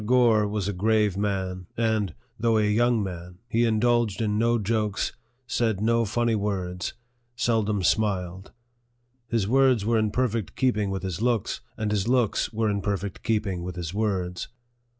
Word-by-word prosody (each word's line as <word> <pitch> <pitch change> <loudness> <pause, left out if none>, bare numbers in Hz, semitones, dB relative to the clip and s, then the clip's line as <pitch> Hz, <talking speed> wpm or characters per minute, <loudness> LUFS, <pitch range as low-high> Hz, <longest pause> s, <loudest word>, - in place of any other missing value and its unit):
Gore 115 -2 +4
was 100 -2 -2
a 100 - -1
grave 105 +1 +2
man, 95 -3 -2
and, 110 -6 0 0.2
though 115 0 +3
a 110 - +3
young 115 +1 +2
man, 90 -1 -7
he 120 +1 +2
indulged 115 -1 +2
in 105 -2 0
no 115 +1 +3
jokes, 105 -1 -1 0.3
said 115 -4 0
no 115 +2 +2
funny 120 +2 +1
words, 95 -4 -2 0.4
seldom 110 -4 +1
smiled. 95 -2 0 0.8
His 115 -5 0
words 130 -3 +3
were 115 0 +3
in 110 -1 +1
perfect 115 -3 -1
keeping 110 -6 +1
with 95 -1 -3
his 95 0 -3
looks, 120 -4 0 0.2
and 105 -1 -1
his 100 -1 0
looks 125 -3 +1
were 110 0 0
in 100 -1 0
perfect 100 0 -3
keeping 105 -5 -1
with 90 0 -5
his 85 -1 -5
words. 95 -4 -1
105 Hz, 160 wpm, -26 LUFS, 95-115 Hz, 0.8 s, Gore